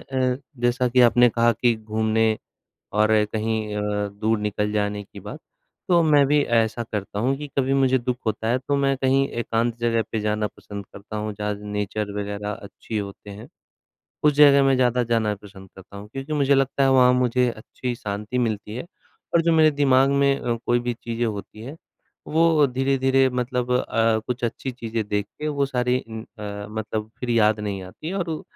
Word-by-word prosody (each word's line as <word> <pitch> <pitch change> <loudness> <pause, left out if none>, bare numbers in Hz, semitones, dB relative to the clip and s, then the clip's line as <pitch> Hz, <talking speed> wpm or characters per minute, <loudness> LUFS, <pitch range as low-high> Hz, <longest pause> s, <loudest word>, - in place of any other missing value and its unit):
अ, 130 -1 -1 0.2
जैसा 120 +1 +1
कि 125 +1 +3
आपने 120 0 +5
कहा 115 +1 +2
कि 115 +1 +2
घूमने, 110 0 0 0.6
और 105 0 +3 0.2
कहीं 110 -1 -2
अ, 105 0 -1
दूर 105 +2 -1
निकल 105 0 -1
जाने 105 -1 -1
की - - -13
बात, - - -8 0.5
तो 170 -2 +5
मैं 145 -3 +5
भी 145 +1 +3 0.2
ऐसा 115 +1 +1
करता 100 0 -4
हूँ 130 +4 +1
कि 150 +1 -6
कभी 135 0 +1
मुझे 130 -1 +3
दुख 125 +1 -2
होता 110 +1 -1
है, 125 +2 +2
तो 140 +2 -1
मैं 135 -1 +1
कहीं 135 +1 +2
एकांत 115 0 -1
जगह 115 -1 +1
पे 110 - -1
जाना 105 0 0
पसंद 100 -1 -8
करता 105 +2 -9
हूँ, 105 0 -3
जहाँ 105 0 -1
नेचर 105 0 -3
वगैरह 105 0 -4
अच्छी 105 +1 -7
होते 100 0 -7
हैं। 100 +2 -10 0.8
उस 150 - +6
जगह 140 -1 +7
मैं 135 0 +4
ज़्यादा 125 -1 +2
जाना 110 -2 +1
पसंद 95 -2 -13
करता 95 +1 -13
हूँ, 105 +1 -9
क्योंकि 135 +3 -5
मुझे 140 -1 +3
लगता 135 0 +1
है, 135 - +4
वहाँ 125 -1 +6
मुझे 125 0 +2
अच्छी 120 +2 -6
शांति 105 +2 -4
मिलती 110 -2 -2
है, 130 - -6 0.5
और 165 - +5
जो 170 0 +2
मेरे 155 -1 +5
दिमाग 135 -2 +3
में 140 0 +3
अ, 120 -1 -1
कोई 120 0 +3
भी 120 0 -2
चीज़ें 115 0 -3
होती 105 0 -6
हैं, 140 +6 -8 0.5
वो 160 -2 +4
धीरे-धीरे 135 0 +2
मतलब 125 0 -2
अ, 115 -2 +1
कुछ 125 0 -3
अच्छी 125 +3 -3
चीज़ें 115 -2 -4
देख 105 0 -1
के, 150 0 -2
वो 140 -2 0
सारी 125 -1 0
उम, 110 0 -6
अ, 105 -3 -8
मतलब 110 0 -4
फिर 125 -1 -3
याद 110 -2 +3
नहीं 100 -2 -4
आती 95 - -9
हैं, 190 - -4
और 170 -5 -3
120 Hz, 195 wpm, -23 LUFS, 105-135 Hz, 0.8 s, जगह